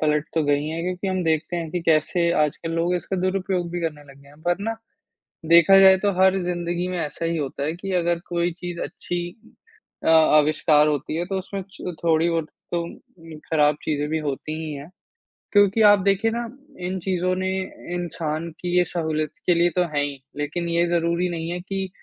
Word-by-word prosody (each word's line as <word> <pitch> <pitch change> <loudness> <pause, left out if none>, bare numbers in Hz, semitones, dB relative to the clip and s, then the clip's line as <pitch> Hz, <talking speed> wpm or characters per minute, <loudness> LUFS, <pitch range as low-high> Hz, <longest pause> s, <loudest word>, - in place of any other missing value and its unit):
पलट 150 -1 +1
तो 160 - +2
गई 145 +1 +1
हैं 165 +1 -3
क्योंकि 180 +2 -3
हम 185 -1 -1
देखते 160 +2 0
हैं 165 -2 -4
कि 175 - -2
कैसे 165 +2 +2
आजकल 150 +2 -2
लोग 170 +2 0
इसका 180 +2 -3
दुरुपयोग 185 -1 -1
भी 175 0 -3
करने 150 -3 -4
लगे 140 +1 -19
हैं। 145 +2 -18
पर 175 +1 +1
ना, 225 +2 -2 0.7
देखा 170 +4 +7
जाए 190 0 +8
तो 200 +1 +1
हर 190 0 +5
ज़िंदगी 175 0 -2
में 180 0 -3
ऐसा 150 +1 -3
ही 165 0 0
होता 140 -2 -3
है 155 +3 -1
कि 195 +2 -6
अगर 170 0 0
कोई 175 0 0
चीज़ 175 0 -6
अच्छी 175 0 -4 0.7
अ, - - +3
आविष्कार 155 -1 +5
होती 150 0 -1
है 170 +2 -1
तो 195 +1 -3
उसमें 195 +1 -6
च 180 - -6
थोड़ी 165 0 +3
बहुत 165 -2 -1 0.2
तो 170 - 0
उम, 170 - -8 0.6
खराब 150 -2 +3
चीज़ें 150 -1 -1
भी 160 0 0
होती 150 +1 -4
ही 155 - -5
हैं। 140 +2 -8 0.6
क्योंकि 205 +1 +4
आप 205 0 +6
देखिए 200 +4 +2
ना, 235 +1 -2 0.4
इन 180 +1 -3
चीज़ों 185 0 0
ने 185 0 -1 0.5
इंसान 165 -2 -3
की 180 0 -1
ये 180 - +6
सहूलियत 155 -3 -2
के 180 - +4
लिए 170 +1 +3
तो 180 - +3
हैं 145 - +2
ही 145 -1 -3 0.2
लेकिन 155 +4 -3
ये 170 +1 +2
ज़रूरी 170 +1 +1
नहीं 165 -1 -4
है 175 - -3
कि 195 +1 -4
170 Hz, 200 wpm, -23 LUFS, 155-180 Hz, 0.7 s, जाए